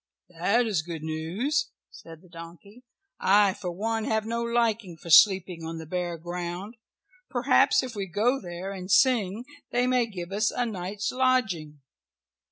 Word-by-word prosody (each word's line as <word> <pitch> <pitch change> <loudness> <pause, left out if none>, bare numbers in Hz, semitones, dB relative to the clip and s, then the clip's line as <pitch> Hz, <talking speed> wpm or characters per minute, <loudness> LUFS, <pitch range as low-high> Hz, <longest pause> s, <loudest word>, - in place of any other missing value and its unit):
"That 200 +8 +1
is 205 -8 0
good 165 -1 -7
news," 180 - -2 0.2
said 165 +1 -13
the - - -18
donkey. 170 +7 -12 0.4
"I 200 0 +4
for 180 - -6
one 220 +4 -2
have 220 -1 0
no 230 +1 -2
liking 230 -6 0
for 170 +1 -8
sleeping 180 -1 +5
on 165 0 -5
the 160 - -7
bare 175 +1 -3
ground. 175 +4 -5 0.6
Perhaps 255 +1 +3
if 255 -2 -6
we 200 -2 -3
go 225 +9 +1
there 180 +2 -6
and 185 -1 -7
sing 220 0 +3 0.3
they 245 +1 +2
may 250 -2 +2
give 180 -4 -7
us 210 +2 +1
a 245 - -1
night's 200 -1 -4
lodging." 220 - 0
195 Hz, 160 wpm, -26 LUFS, 175-230 Hz, 0.6 s, sleeping